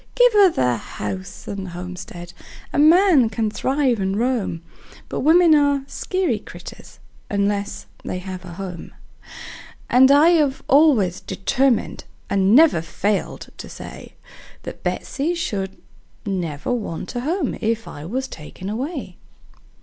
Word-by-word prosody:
Give - - +5
her 405 -3 +7
the 125 - +1
house 100 -3 -7
and 195 -1 -5
homestead 175 0 -8 0.4
a - - +1
man 315 - +6
can 220 -1 -1
thrive 260 -1 0
and 190 +1 -1
roam; 225 -9 -1 0.5
But - - -3
women 330 +3 +5
are 285 -2 +3
skeery 345 - -1
critters, - - -12 0.3
unless 200 0 -1 0.2
they - - -4
have 185 0 -7
a 175 -2 -9
home; 180 -2 -8 1.0
And 260 +2 +7
I 290 +4 +6
have 295 -6 +2
always 260 - +4
determined, 240 +6 0 0.3
and 200 +2 +4
never 300 - +6
failed 200 +5 -2
to - - -8
say, - - -10 0.5
That - - -8
Betsey 315 +6 -2
never - - -5
should 195 - -3 0.5
want 180 +1 -3
a - - -1
home 305 +3 -2
if 225 0 -1
I 145 - -8
was 255 +11 -3
taken 180 +5 -8
away. 270 +10 -5
225 Hz, 135 wpm, -21 LUFS, 185-285 Hz, 1.0 s, her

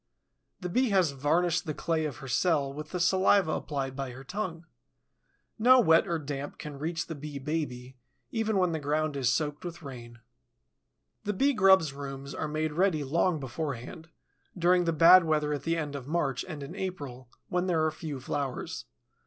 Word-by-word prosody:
The 180 - -3
Bee 250 +8 +2
has 185 -6 +3
varnished 165 +5 +1
the 155 - -2
clay 160 -1 -1
of 145 -5 -4
her - - -7
cell 140 0 +1
with 150 +1 -7
the 180 - -3
saliva 185 -1 +4
applied 135 -4 -3
by 135 -1 -4
her 130 +2 -10
tongue. 175 0 -4 0.9
No 255 +3 +7
wet 165 -5 +5
or 170 -2 0
damp 145 -1 -5
can 145 -2 -8
reach 165 +3 -2
the 165 - -6
Bee 145 -1 -7
baby, 130 -3 -4 0.3
even 220 -2 0
when 180 -2 +2
the 160 - -2
ground 150 +1 -1
is 130 -3 +2
soaked 150 +3 -1
with 170 -2 -7
rain. 120 -4 -9 1.1
The 210 - -1
Bee 275 +8 +2
grub's 190 - +5
rooms 140 0 -7
are 155 - -3
made 155 0 -2
ready 170 -3 +2
long 165 +4 +1
beforehand, 140 +3 -5 0.5
during 175 +1 +3
the 165 - +2
bad 170 +3 +8
weather 150 -2 +1
at 145 - -3
the 165 0 0
end 150 -3 -3
of 135 -2 -7
March 145 -5 0
and 155 -5 -6
in 140 - -8
April, 140 -10 -6 0.2
when 180 +1 0
there 160 -3 +2
are 155 - +1
few 155 -3 -6
flowers. 135 0 -4
155 Hz, 185 wpm, -29 LUFS, 140-175 Hz, 1.1 s, bad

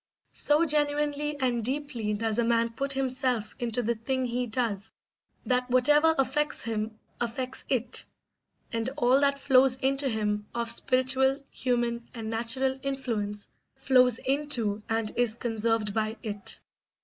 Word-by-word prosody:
So 300 +3 +2
genuinely 295 0 0
and 245 -3 0
deeply 250 -5 -2
does 220 +1 0
a - - +3
man 230 0 +1
put 275 +4 0
himself 255 -4 0
into 240 0 -1
the 235 +2 +1
thing 255 +3 -2
he 245 0 -2
does 220 -4 -2 0.5
that 250 0 0
whatever 295 +6 +5
affects 270 +3 +1
him 220 -1 -3 0.2
affects 250 +2 -3
it, 250 -2 0 0.7
and 230 +2 -1
all 255 0 +4
that 280 0 +2
flows 265 -2 +4
into 270 +1 +1
him 210 -2 -1
of 235 -1 +1
spiritual, 260 +3 +2
human, 240 -2 -1
and 225 -1 -5
natural 260 +4 0
influence 225 -7 -3 0.3
flows 255 -3 +4
into 255 -7 0
and 225 -1 -1
is 240 -2 +1
conserved 225 -2 0
by 220 +1 -1
it. 205 -3 -4
245 Hz, 135 wpm, -28 LUFS, 225-270 Hz, 0.7 s, whatever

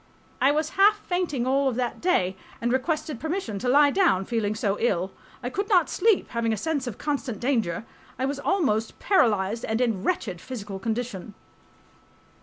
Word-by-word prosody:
I 270 - +5
was 310 +1 0
half 415 +1 +7
fainting 350 -9 -1
all 270 +1 +2
of 250 - -3
that 245 -1 -2
day 190 - +2 0.2
and... 240 +1 0
requested 290 0 -1
permission 315 - -3
to 245 - -1
lie 285 +2 +6
down, 305 - +3
feeling 215 -2 -1
so 210 -2 0
ill.... 190 -5 0 0.3
I 245 - -3
could 400 +6 -2
not 365 -5 +4
sleep, 440 -3 +2
having 235 -1 -1
a 220 - 0
sense 285 +2 -2
of 230 - -5
constant 275 -7 -3
danger.... 225 -7 0 0.3
I 260 - 0
was 280 +1 -2
almost 275 - 0
paralyzed 225 - +2
and 220 +1 -1
in 225 -6 0
wretched 195 - -1
physical 205 -6 -6
condition. 220 -2 -4
245 Hz, 175 wpm, -26 LUFS, 215-295 Hz, 0.3 s, half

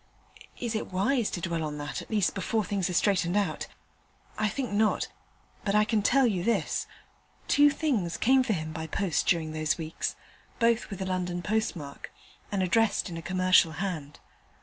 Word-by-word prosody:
Is 240 -2 -2
it 220 - -3
wise 225 +5 +1
to 175 - -4
dwell 170 0 -2
on 150 -1 -4
that, 145 0 -4
at - - -12
least 210 -4 +1
before 210 +3 0
things 200 -2 -1
are - - -3
straightened 185 -1 +2
out? 205 - -1 0.7
I 215 0 +1
think 245 +2 -3
not, 215 +1 +1 0.5
but 200 0 0
I 210 0 +5
can 220 -1 +1
tell 270 +6 +4
you 195 -7 +1
this: 230 +4 0 0.6
two 290 0 +6
things 245 - -1
came 260 +3 +4
for 250 -4 0
him 155 -3 -4
by 160 0 -5
post 180 +1 0
during 165 -3 +2
those 155 +2 0
weeks, 160 -1 -3 0.4
both 235 -1 +2
with 195 -2 -4
a - - -4
London 180 -1 -2
postmark, 175 -9 -3 0.4
and 195 -2 +1
addressed 205 0 +2
in 165 - -5
a - - -5
commercial 185 -2 +3
hand. 160 -5 -4
190 Hz, 180 wpm, -28 LUFS, 170-220 Hz, 0.7 s, two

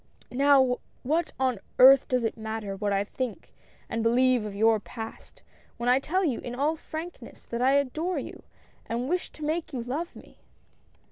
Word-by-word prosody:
Now, 265 -1 +4 0.3
what 315 +5 0
on 255 -5 +1 0.2
earth 270 +2 +8
does 250 -2 +1
it 225 - -1
matter 220 -2 -4
what 205 +1 -1
I 200 0 +2
think 240 +2 -5 0.3
and 230 - -2
believe 245 0 +3
of 205 -1 -6
your 220 +1 +4
Past, 225 +1 -9 0.3
when 240 +1 0
I 255 +2 +5
tell 370 +7 0
you, 270 -7 0
in 245 0 -6
all 295 +5 +1
frankness, 320 +2 -8
that 235 +1 -4
I 265 +2 +4
adore 305 +6 0
you, - - -6 0.5
and 235 +2 -2
wish 355 +4 -1
to 310 - -10
make 315 0 -2
you 245 -3 -3
love 295 +8 -4
me - - -15
255 Hz, 180 wpm, -27 LUFS, 230-290 Hz, 0.5 s, earth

